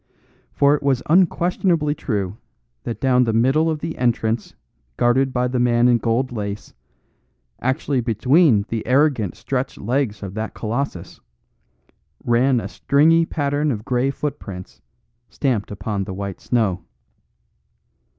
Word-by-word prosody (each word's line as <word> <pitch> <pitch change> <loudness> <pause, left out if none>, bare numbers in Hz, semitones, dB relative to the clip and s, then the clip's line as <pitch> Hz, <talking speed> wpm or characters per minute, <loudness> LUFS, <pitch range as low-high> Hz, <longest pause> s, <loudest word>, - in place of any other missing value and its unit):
For 140 0 +3
it 150 - 0
was 135 -3 +1
unquestionably 170 -2 +2
true 105 -9 -3 0.5
that 115 -3 -4
down 125 -1 +3
the 115 - 0
middle 135 +8 +3
of 155 -2 -2
the 165 0 -5
entrance 115 -2 0 0.4
guarded 130 +3 +2
by 125 0 0
the 125 0 -1
man 120 0 +3
in 120 -1 +4
gold 120 +3 0
lace, 105 -3 -5 0.9
actually 130 +1 0
between 120 - +3
the 115 -2 -2
arrogant, 130 - +2
stretched 135 0 -3
legs 120 -2 -2
of 95 -2 -6
that 110 +1 -5
colossus, 115 -5 -4 1.0
ran 125 +2 +3
a 100 - -5
stringy 160 +8 +3
pattern 145 0 -1
of 110 -2 -5
grey 125 +1 +1
footprints 105 -10 -6 0.5
stamped 125 -7 -1
upon 100 0 -3
the 95 - -6
white 100 -1 -6
snow. 105 -7 0
125 Hz, 130 wpm, -21 LUFS, 110-140 Hz, 1.0 s, in